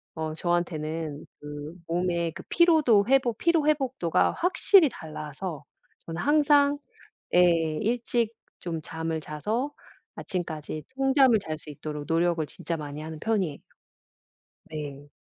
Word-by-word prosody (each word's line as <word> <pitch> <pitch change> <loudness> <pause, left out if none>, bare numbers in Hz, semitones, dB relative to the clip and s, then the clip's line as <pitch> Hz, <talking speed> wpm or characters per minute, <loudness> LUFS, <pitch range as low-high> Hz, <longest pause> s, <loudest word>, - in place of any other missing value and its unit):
어 160 -1 -3
저한테는 160 -3 -2
그 150 +1 -7
몸에 170 -1 0
그 - - -10
피로도 310 -12 +5
회복 255 -4 +3
피로 335 -3 +3
회복도가 260 - +2
확실히 360 -1 +5
달라서 155 - -7 0.4
저는 165 +1 -4
항상 290 -1 +4 0.6
예 165 -3 +4
일찍 235 0 0 0.3
좀 165 -2 -4
잠을 160 0 -3
자서 215 - -2 0.4
아침까지 155 -4 -4
통잠을 270 -3 +5
잘 155 -6 -5
수 155 - -15
있도록 150 0 -6
노력을 165 0 +2
진짜 165 - -4
많이 150 0 -6
하는 155 0 -7
편이에요. 190 -10 0 1.1
네. 145 -2 -6
170 Hz, 250 characters per minute, -27 LUFS, 155-245 Hz, 1.1 s, 피로도